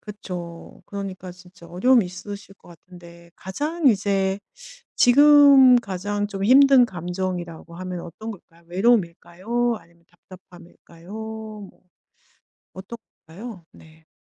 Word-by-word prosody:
그쵸. 180 -5 -9
그러니까 190 -2 -7
진짜 180 -1 -17
어려움이 220 +5 +3
있으실 195 +2 -10
것 - - -21
같은데 170 0 -16
가장 295 - -3
이제 195 -2 0 0.6
지금 280 -1 +7
가장 205 -1 -3
좀 195 -1 -6
힘든 270 +1 +6
감정이라고 175 -2 -6
하면 185 -1 -6
어떤 215 +7 -9
걸까요? 170 -4 -14
외로움일까요? 215 +3 0
아니면 170 0 -25
답답함일까요? 175 -1 -17
뭐 220 -2 -9 0.9
어떤 190 +5 -9 0.3
걸까요? 190 +2 -10
네. 160 0 -19
190 Hz, 270 characters per minute, -22 LUFS, 175-220 Hz, 0.9 s, 지금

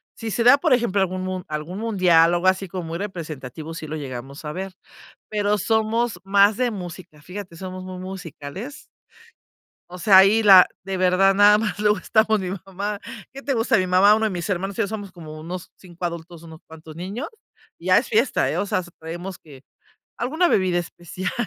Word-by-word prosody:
Si 225 -2 -5
se 235 - 0
da, 250 +4 +7
por 295 -2 +2
ejemplo, 235 -5 +1
algún 185 -1 -1
mun 185 -1 -4
algún 155 +5 -5
mundial, 180 -7 +4
o - - +3
algo 175 +2 0
así 190 +1 +2
como 180 0 -5
muy 165 - -3
representativo, 160 -5 -7
sí 160 -1 -7
lo 155 - -5
llegamos 135 0 -7
a 150 - -5
ver, 190 +3 -6 0.6
pero 210 0 0
somos 220 0 0
más 200 +2 +4
de 250 -1 +1
música, 175 -6 -9
fíjate, 180 +1 -9
somos 185 +1 -7
muy 185 0 -8
musicales. 185 - -8 1.1
O 180 - -9
sea, 190 +2 +6
ahí 205 +4 +6
la 190 -3 +9 0.2
de 190 0 -4
verdad 185 +1 +4
nada 205 +1 +6
más 210 -2 -3
luego 210 0 +3
estamos 220 -1 +2
mi 185 - -4 0.2
mamá, 200 +2 -4 0.3
¿qué 275 - -9
te 275 0 -1
gusta?, 230 -1 +2
mi 185 -1 0
mamá, 195 +3 +5
uno 220 0 0
de - - +1
mis 180 0 -4
hermanos, 195 +1 -2
te 225 - 0
digo 200 - -1
somos 205 -3 -6
como 155 -3 -10
unos 175 +3 -7
5 180 -1 -14
adultos, 170 -1 -5
unos 160 -1 -12
cuantos 160 0 -12
niños, 200 - -5 0.5
ya 185 +2 +3
es 240 - 0
fiesta, 230 +4 +2
¿eh? - - -2
O - - 0
sea, 195 - 0
hasta 175 -1 -9
traemos 175 +3 -7
que 140 -4 -15 0.6
alguna 310 +9 +1
bebida 185 - +2
especial, 175 +1 -5
185 Hz, 200 wpm, -22 LUFS, 170-210 Hz, 1.1 s, la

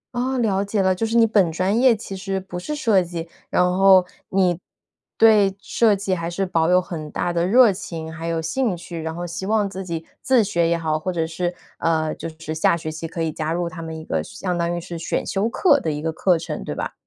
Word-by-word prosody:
哦， 260 +2 -1
了 200 -5 +1
解 205 +1 -2
了， 190 0 +3
就 225 +5 -1
是 230 +1 +1
你 230 - +7
本 200 -6 +3
专 185 +7 +1
业 255 -3 +6
其 200 -2 -7
实 195 0 -3
不 185 -2 -7
是 300 +12 -4
设 225 -10 +3
计， 170 -1 -5 0.2
然 - - +3
后 185 +1 +5 0.2
你 180 -3 +2 0.6
对 210 -4 +5
设 215 +1 +2
计 195 -1 -2
还 170 -2 -2
是 190 +3 -1
保 165 -2 +1
有 180 0 +5
很 165 -4 -6
大 175 - -1
的 170 +1 +1
热 230 0 +6
情， 160 -3 -6
还 165 +1 -6
有 165 -1 -1
兴 185 +5 -1
趣， 170 -1 -7
然 160 0 -4
后 175 - -4
希 175 +2 -5
望 215 -1 +2
自 190 0 -6
己 165 -3 -5 0.2
自 255 -4 +4
学 170 -5 +1
也 170 - +2
好， 155 -2 -1
或 185 +4 -2
者 165 -2 -1
是， 175 +2 -3 0.2
呃， 160 -2 +1
就 - - -6
是 155 -1 -5
下 160 +1 +2
学 155 -1 -5
期 160 +1 -6
可 165 0 -4
以 160 - -1
加 155 0 -3
入 175 0 -1
他 165 0 -7
们 160 0 -6
一 160 - -9
个 80 -1 -1
相 175 - -4
当 170 0 -1
于 - - -2
是 170 0 -7
选 - - -2
修 200 +3 0
课 285 +3 +4
的 160 - -2
一 150 - -3
个 160 +1 -2
课 175 +1 +2
程， 165 - -5
对 - - -5
吧？ - - -4
175 Hz, 265 characters per minute, -22 LUFS, 165-195 Hz, 0.6 s, 你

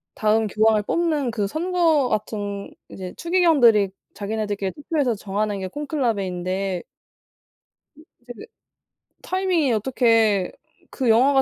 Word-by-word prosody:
다음 215 +1 +2
교황을 215 +1 +2
뽑는 305 -4 0
그 210 -3 -1
선거 325 - +1
같은 205 -2 -3 0.2
이제 185 -1 -8
추기경들이 290 - +4 0.2
자기네들끼리 205 -2 -3
투표해서 285 -5 -1
정하는 205 0 -2
게 190 - -4
콘클라베인데 195 - -2 1.1
이제 310 - -17 0.2
그 245 - -7
이제 230 - -12 0.8
타이밍이 370 -7 0
어떻게 225 -4 +2 0.4
그 255 -4 -1
영화가 270 +5 +5
225 Hz, 290 characters per minute, -23 LUFS, 200-290 Hz, 1.1 s, 영화가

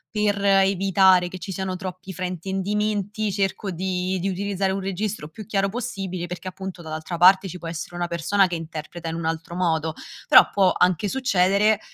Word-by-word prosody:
per 205 -1 +1
evitare 195 -1 +4
che 185 +1 -8
ci 190 +2 -6
siano 190 0 -3
troppi 185 0 -7
fraintendimenti 200 +4 -2
cerco 195 0 -1
di 185 +1 -2
di 195 - 0
utilizzare 195 0 -1
un 195 - -2
registro 195 -3 -3
più 205 +6 -10
chiaro 195 -2 0
possibile, 195 -6 -4
perché 180 +1 -7
appunto 190 -1 -8
dall'altra 160 +2 -5
parte 190 +2 +6
ci 180 - -7
può 170 - -8
essere 170 +1 -6
una 175 0 -1
persona 170 +3 +2
che 175 - -3
interpreta 165 +1 -6
in 165 - -4
un 165 -1 -4
altro 165 +1 -3
modo, 160 -3 0 0.3
però - - +8
può 190 -2 +3
anche 180 +3 +2
succedere 205 -3 +2
190 Hz, 175 wpm, -23 LUFS, 175-195 Hz, 0.3 s, però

